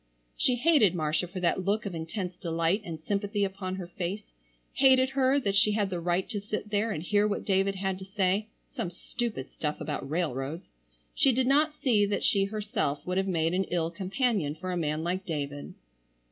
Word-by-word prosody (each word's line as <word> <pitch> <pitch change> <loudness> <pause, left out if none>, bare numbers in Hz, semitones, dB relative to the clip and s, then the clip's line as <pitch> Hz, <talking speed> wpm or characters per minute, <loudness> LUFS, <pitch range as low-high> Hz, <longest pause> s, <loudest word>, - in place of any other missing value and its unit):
She 250 - +2
hated 245 - +4
Marcia 155 +2 0
for 185 +2 -6
that 180 +1 +1
look 205 +3 0
of 200 - -3
intense 180 +3 -4
delight 165 +4 0
and 165 -5 -6
sympathy 205 +4 -1
upon 190 -1 -3
her 190 -2 -5
face; 185 +4 -5 0.4
hated 260 -1 +5
her 270 +1 +3
that 200 -7 -1
she 205 +1 +4
had 205 -2 0
the 175 - -2
right 175 +2 0
to 210 -4 -3
sit 210 +1 -4
there 210 +2 +1
and 160 -7 -3
hear 205 +3 +3
what 205 - -2
David 195 0 +2
had 190 0 -2
to 190 - -8
say—some 195 0 -2
stupid 210 - -4
stuff 150 -1 -3
about 145 -2 -4
railroads. 155 -1 -2 0.4
She 270 - +4
did 255 +1 +1
not 300 +3 +3
see 215 -8 +3
that 205 - -1
she 195 -1 +3
herself 205 - -2
would 180 +1 -1
have 190 0 +1
made 165 -2 +1
an 190 +1 +1
ill 170 -2 -1
companion 190 - 0
for 185 +3 -5
a - - -1
man 155 -2 -1
like 180 +3 -1
David. 145 -4 -4
190 Hz, 195 wpm, -29 LUFS, 170-210 Hz, 0.4 s, hated